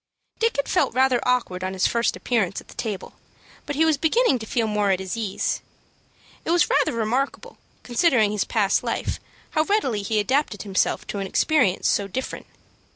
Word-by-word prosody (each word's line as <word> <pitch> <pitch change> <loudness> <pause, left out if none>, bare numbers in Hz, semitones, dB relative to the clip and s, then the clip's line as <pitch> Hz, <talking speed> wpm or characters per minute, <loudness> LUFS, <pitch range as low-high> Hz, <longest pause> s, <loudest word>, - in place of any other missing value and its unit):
Dick 460 0 +1
had 280 - -1
felt - - +1
rather 260 -1 +3
awkward 235 -8 0
on 185 0 -2
his 185 - +1
first 235 0 +1
appearance 205 -6 0
at - - -16
the - - -11
table, 210 -5 -5 0.5
but 290 - -3
he 320 +3 +3
was 310 -3 +2
beginning 320 - +3
to 220 - -8
feel 230 0 0
more 210 -2 0
at 190 -1 +2
his 190 +3 -4
ease. 215 -4 -2 0.8
It - - -5
was 345 +1 +3
rather 285 0 +3
remarkable, 235 +4 -2 0.2
considering 240 -4 +3
his 210 -2 0
past 205 -3 +1
life, - - -2 0.3
how 310 - +2
readily 310 - 0
he 215 +2 0
adapted 255 0 0
himself 195 -3 0
to 205 - -4
an 195 - -3
experience 250 - +2
so 200 - +1
different. 260 +7 -5
230 Hz, 185 wpm, -23 LUFS, 200-275 Hz, 0.8 s, rather